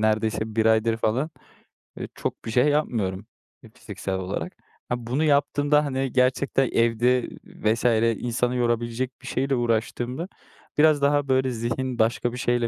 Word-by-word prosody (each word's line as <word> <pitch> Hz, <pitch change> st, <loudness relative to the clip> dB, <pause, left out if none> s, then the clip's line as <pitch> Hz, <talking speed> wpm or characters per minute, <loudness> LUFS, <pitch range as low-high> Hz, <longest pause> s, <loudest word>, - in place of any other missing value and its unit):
neredeyse 110 Hz, 0 st, 0 dB
1 110 Hz, -, +3 dB
aydır 110 Hz, 0 st, +3 dB
falan, 120 Hz, +8 st, 0 dB, 0.7 s
ııı, -, -, -4 dB
çok -, -, -5 dB
bir 115 Hz, -, -4 dB
şey 125 Hz, +5 st, +3 dB
yapmıyorum, 110 Hz, -10 st, 0 dB, 0.4 s
eee, -, -, -14 dB
fiziksel 95 Hz, -1 st, -5 dB
olarak. 95 Hz, +1 st, -4 dB, 0.4 s
Ha 125 Hz, -, +1 dB
bunu 135 Hz, +6 st, 0 dB
yaptığımda, 145 Hz, 0 st, +2 dB
hani, 135 Hz, -2 st, -2 dB
gerçekten 130 Hz, +1 st, +2 dB
evde 115 Hz, +2 st, +2 dB
vs. 110 Hz, +3 st, -2 dB, 0.4 s
insanı 120 Hz, +1 st, -1 dB
yorabilecek 120 Hz, +1 st, -1 dB
bir -, -, -11 dB
şeyle 135 Hz, +1 st, 0 dB
uğraştığımda 120 Hz, +5 st, -1 dB, 0.5 s
biraz 150 Hz, -1 st, +5 dB
daha 145 Hz, 0 st, +2 dB
böyle 130 Hz, -1 st, +2 dB
zihin 120 Hz, +2 st, -3 dB
başka 115 Hz, +2 st, +1 dB
bir 125 Hz, -, -5 dB
şeyle 120 Hz, -1 st, +1 dB
120 Hz, 145 wpm, -24 LUFS, 115-135 Hz, 0.7 s, biraz